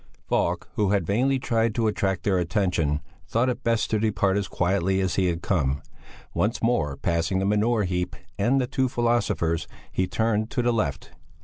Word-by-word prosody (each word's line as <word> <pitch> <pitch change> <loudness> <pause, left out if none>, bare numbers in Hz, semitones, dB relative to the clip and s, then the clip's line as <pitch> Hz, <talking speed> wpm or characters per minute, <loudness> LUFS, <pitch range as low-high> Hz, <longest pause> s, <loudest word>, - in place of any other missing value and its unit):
Falk, - - 0
who 105 -2 +2
had 100 -4 +1
vainly 130 +8 +2
tried 115 -3 0
to 115 - +1
attract 95 -3 0
their 95 -3 +2
attention, 85 -4 0 0.3
thought 120 +3 +1
it 125 - -3
best 115 -1 +1
to 110 - +2
depart 100 -3 +1
as 100 -2 0
quietly 95 +2 +1
as 95 -2 0
he 95 -1 +2
had 85 -1 -2
come. 70 -7 0 0.5
Once 110 +3 0
more 75 - 0
passing 85 +2 0
the 95 - 0
manure 105 +2 +2
heap 90 -1 -2 0.2
and 120 +7 +2
the 130 - +1
two 130 0 0
philosophers, 115 -9 0 0.2
he 95 - 0
turned 110 0 0
to 125 - -1
the 120 0 +2
left. 70 -11 -2
100 Hz, 185 wpm, -25 LUFS, 90-115 Hz, 0.5 s, who